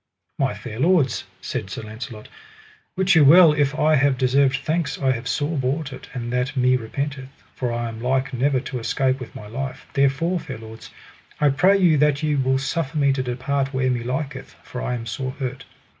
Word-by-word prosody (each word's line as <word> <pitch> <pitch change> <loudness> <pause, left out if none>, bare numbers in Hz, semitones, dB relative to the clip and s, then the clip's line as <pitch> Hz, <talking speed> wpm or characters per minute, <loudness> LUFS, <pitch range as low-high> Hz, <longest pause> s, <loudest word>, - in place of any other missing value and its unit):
My 135 -5 +1
fair 110 +2 -8
lords, 155 -6 +2 0.2
said 110 -6 -4
Sir 110 - -6
Launcelot, 110 0 -8 0.7
wit 190 0 +3
you 160 -3 +6
well 160 +2 +8
if 145 0 0
I 155 +1 +3
have 135 -1 +2
deserved 135 +1 +3
thanks 155 0 -2
I 135 -2 +2
have 125 -1 -3
sore 145 +5 -1
bought 135 +2 -2
it, - - -11
and 120 -1 -4
that 125 +3 -1
me 130 0 +4
repenteth, 135 +3 -4 0.2
for 125 -2 -2
I 120 0 -2
am 115 0 -7
like 130 +2 0
never 130 +2 +1
to 125 -1 -5
escape 130 +3 0
with 125 - -9
my 105 - -8
life; 130 +5 -6
therefore, 140 +6 +1
fair 135 -7 -7
lords, 110 0 -11 0.5
I 150 - +4
pray 180 +9 +4
you 170 -6 +4
that 150 0 +2
ye 150 -1 +1
will 130 -1 +2
suffer 135 +2 -2
me 140 -2 +3
to 135 - -1
depart 135 +2 -2
where 130 -1 +1
me 120 -1 -1
liketh, 135 +2 -4
for 125 - -7
I 125 - -2
am 115 -1 -6
sore 130 +3 -4
hurt. 130 -1 -5
135 Hz, 205 wpm, -22 LUFS, 125-145 Hz, 0.7 s, well